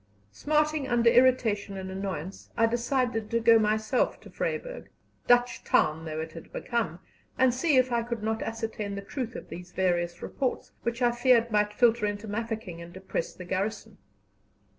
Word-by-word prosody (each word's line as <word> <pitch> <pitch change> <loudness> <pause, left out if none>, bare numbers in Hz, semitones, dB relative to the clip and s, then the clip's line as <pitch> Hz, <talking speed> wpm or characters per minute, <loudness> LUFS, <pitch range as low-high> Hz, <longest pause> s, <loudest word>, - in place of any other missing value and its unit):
Smarting 300 - +1
under 235 -2 +4
irritation 230 -6 +3
and 190 0 -6
annoyance, 190 -2 -5
I 230 - +5
decided 240 -1 0
to 230 - +1
go 230 0 +6
myself 215 +3 +1
to - - -13
Vryburg - - -4 0.4
Dutch 245 0 +3
town 155 +1 +2
though 155 -1 -4
it 160 0 -5
had 165 0 -11
become 230 -9 -2 0.4
and 260 -1 +4
see 275 +3 +2
if 255 0 +3
I 235 -1 +2
could 230 -2 -4
not 220 +1 -1
ascertain 225 -3 -4
the 200 - -5
truth 245 +2 -5
of - - -8
these 175 0 -9
various 175 -2 0
reports, 260 -3 -3
which 235 +1 -2
I 240 - +4
feared 240 -1 +3
might 210 -1 +2
filter 230 -1 +3
into 205 +1 -4
Mafeking 215 -5 -4
and 170 0 -10
depress 190 -2 -4
the 180 - -9
garrison. 195 +4 -3
225 Hz, 170 wpm, -28 LUFS, 195-245 Hz, 0.4 s, go